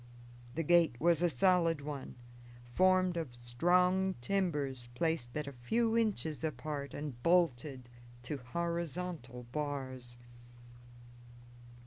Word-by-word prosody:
The 165 - 0
gate 165 -6 +4
was 170 +1 +3
a 175 - +4
solid 170 -2 +3
one, 145 -2 -6 0.6
formed 185 0 +4
of 150 -8 -4
strong 180 +10 +2
timbers 140 -6 -1
placed 150 -4 -1
at 150 - -2
a 140 - -6
few 225 - 0
inches 195 - 0
apart 145 -1 -4
and 145 -5 -6
bolted 140 -6 +2 0.4
to 145 +4 -3
horizontal 170 -2 -4
bars. 130 -4 -4
155 Hz, 105 wpm, -34 LUFS, 130-175 Hz, 0.6 s, gate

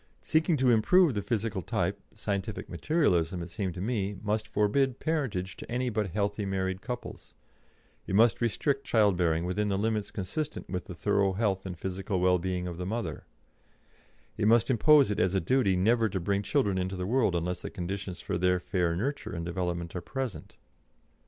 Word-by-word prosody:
Seeking 160 0 +2
to 130 -2 +4
improve 155 +8 +5
the 105 - -1
physical 110 -3 -2
type, - - -2
scientific 100 +1 -3
Materialism, 90 - +1
it 85 - -9
seemed 95 -2 -3
to 90 - -5
me, 100 -2 -1
must 105 +1 -1
forbid 125 +5 +1
parentage 130 - -2
to - - -9
any 125 0 0
but 105 -2 -1
healthy 100 +2 -1
married 95 -1 -2
couples; 125 +1 -7 0.7
it 95 - -1
must 115 +3 +4
restrict 135 +4 0
childbearing 90 -9 +2
within 105 +3 0
the 100 - 0
limits 105 0 -1
consistent 145 +11 -4
with 90 -1 -4
the 90 - -8
thorough 100 +1 +1
health 95 -2 0
and 90 -2 -6
physical 95 +2 -3
well 90 0 +3
being 90 0 -2
of 85 -2 -5
the 90 - -4
mother; 105 -7 -4 1.1
it 105 - +1
must 115 +3 +4
impose 140 +1 +5
it 105 - -1
as 90 +1 +2
a - - +4
duty 100 +1 +2
never 110 +4 +3
to 95 - -2
bring 100 +3 0
children 100 -4 +1
into 95 +1 -2
the 90 0 -3
world 110 -3 +2
unless 90 +1 -2
the - - -5
conditions 95 +1 -5
for - - -3
their 90 0 +3
fair 90 -2 0
nurture 110 +2 -3
and 85 0 -4
development 85 -1 -3
are 90 - -3
present. 130 +3 -5
100 Hz, 185 wpm, -29 LUFS, 90-115 Hz, 1.1 s, improve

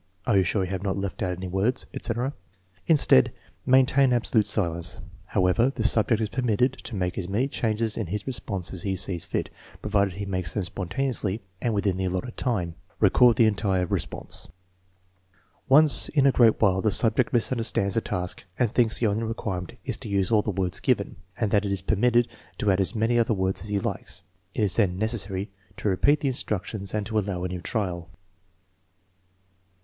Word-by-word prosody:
" 95 - -37
"Are 115 -5 +2
you 95 - +5
sure 95 +2 0
you 90 - -4
have 95 -2 -3
not 100 -1 -2
left 100 -1 -4
out 90 -2 -1
any 95 0 -5
words? 100 +8 0
" - - -34
etc. 125 +4 -2 0.5
Instead, 140 - +5 0.4
maintain 130 0 +4
ab 120 -1 +1
solute 110 -3 +2
silence. 85 -5 -1 0.3
However, 95 +5 +2
the 130 -4 -4
subject 110 -1 +3
is 110 - 0
permitted 125 +1 +1
to 110 - -5
make 90 -1 -2
as 90 -1 -5
many 115 +7 +1
changes 110 -4 -1
in 110 - -2
his 100 +3 -4
response 100 -8 -4
as 90 - -4
he 95 +1 -2
sees 90 -3 0
fit, - - -3 0.3
provided 100 -3 +1
he 100 +1 -5
makes 95 -4 -3
them 105 - 0
spontaneously 100 +3 -2 0.2
and 115 -3 0
within 100 -2 0
the 95 - -1
allotted 95 +7 -3
time. 90 -10 -1 0.3
Record 125 -2 +5
the 115 - +5
entire 100 -4 +1
response. - - -5 1.2
Once 150 +2 +6
in 140 -3 +2
a 140 - +6
great 115 -4 +4
while 95 -3 +3
the 110 - +2
subject 115 +3 +2
misunderstands 115 -4 0
the 115 - +2
task 90 -3 -4
and 120 -4 +1
thinks 115 -2 +3
the 120 - 0
only 105 +1 +1
requirement 110 -5 -4
is 125 -5 -3
to 115 - -9
use 100 -1 0
all 110 -2 +4
the 105 - -4
words 95 -3 -1
given, - - 0 0.2
and 110 -4 -1
that 105 -1 +3
it 100 - -2
is 95 -2 -2
permitted 120 +4 +2 0.3
to 105 - +1
add 95 0 +2
as 95 - -1
many 115 +2 +2
other 115 -1 +2
words 95 -1 -1
as 105 - -7
he 105 - 0
likes. - - -5 0.3
It 110 - 0
is 95 -3 +2
then 95 -5 +2
necessary 100 -2 -2 0.3
to 105 - -1
repeat 140 +10 +2
the 140 - 0
in - - -1
structions 100 -3 -4
and 105 -1 -1
to 110 0 0
allow 95 -3 -3
a - - -1
new 90 -1 -5
trial. 90 -6 -3
105 Hz, 200 wpm, -25 LUFS, 95-115 Hz, 1.2 s, Once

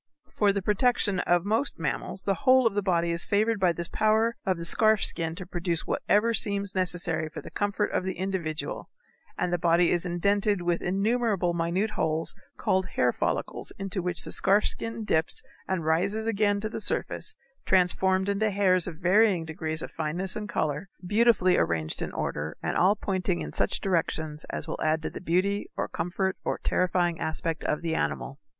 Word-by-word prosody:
For 205 -1 +3
the 200 -1 -2
protection 210 -2 +2
of 175 0 +2
most 225 +7 0
mammals 165 +4 -3
the 195 - +1
whole 255 +7 +4
of 225 - +3
the 205 - 0
body 170 -3 +1
is 170 0 -2
favored 215 +2 +2
by 185 -2 +4
this 170 0 -1
power 220 +3 +2
of 185 -2 +2
the 170 - -6
scarf 215 +3 +3
skin 165 -1 -2
to 185 +1 -7
produce 175 -2 -2
whatever 225 +3 +2
seems 200 -3 +1
necessary 175 -4 0
for - - -7
the - - -10
comfort 205 0 -1
of - - 0
the 190 0 -4
individual, 180 -4 -3 0.5
and 175 - -1
the 175 - +1
body 170 0 +3
is 175 - +1
indented 200 +2 +1
with 175 -1 0
innumerable 200 -1 +1
minute 170 +5 0
holes 160 0 -1 0.2
called 190 0 +1
hair - - +1
follicles - - -3
into 195 -1 -3
which 175 -1 0
the - - -5
scarf 205 +2 +3
skin 230 0 -2
dips 160 -1 0 0.2
and 185 -4 -2
rises 195 +7 +1
again 205 -2 +1
to 215 - -2
the - - -5
surface - - -2 0.3
transformed 190 +1 +3
into 200 +2 +1
hairs 190 -3 +2
of 165 -4 -6
varying 185 0 +3
degrees 160 0 -4
of - - -7
fineness 165 +4 -2
and 210 -1 -5
color, 155 +5 -2 0.2
beautifully 205 -2 +4
arranged 80 -2 -1
in - - -3
order, - - -3
and - - -1
all 190 +4 +4
pointing 185 - -1
in 75 -2 -6
such 100 - 0
directions 160 -4 -2
as 160 - -4
will 160 - -5
add 155 +1 +1
to - - -3
the - - -8
beauty 185 +4 0
or - - -1
comfort 190 +2 -2
or - - -1
terrifying 175 -2 0
aspect 160 0 -3
of 150 - -1
the 165 -1 -1
animal. 135 -3 -2
185 Hz, 185 wpm, -27 LUFS, 170-205 Hz, 0.5 s, whole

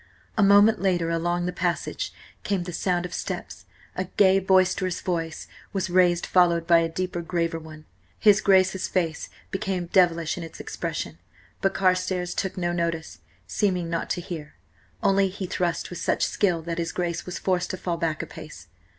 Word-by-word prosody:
A 215 - +2
moment 205 +1 +6
later 175 -4 +1
along 175 +1 0
the 180 - -2
passage 175 -1 -2 0.3
came 195 -3 0
the 175 0 -6
sound 180 0 0
of 180 - -7
steps; 130 - -5 0.3
a 185 - -2
gay, 190 +1 +4
boisterous 185 -1 +2
voice 165 -3 -3 0.3
was 190 -2 -1
raised, 175 -1 +4
followed 170 -2 +3
by 170 0 +6
a 165 0 0
deeper, 180 +1 -3
graver 165 0 -1
one. 155 -1 -12 0.3
His 210 -1 +5
Grace's 190 -1 +3
face 165 -4 -1 0.2
became 195 -3 -2
devilish 170 -4 +3
in 175 - -5
its 165 - -10
expression, - - -4 0.4
but 195 -1 +1
Carstares 185 -1 +1
took 190 - -3
no 175 -1 0
notice, 170 - -2 0.3
seeming 180 - 0
not 165 - -2
to 175 - -1
hear. 160 -4 -7 0.5
Only 195 0 +4
he 190 0 -5
thrust 175 -1 -2
with 180 - -6
such - - +1
skill 175 -5 0
that 170 +1 -3
his 165 0 -2
Grace 175 -1 -3
was 180 - -4
forced 185 -1 0
to 185 - -3
fall 175 -2 -2
back 160 -2 -1
a - - -5
pace. 120 - -11
175 Hz, 175 wpm, -25 LUFS, 170-185 Hz, 0.5 s, moment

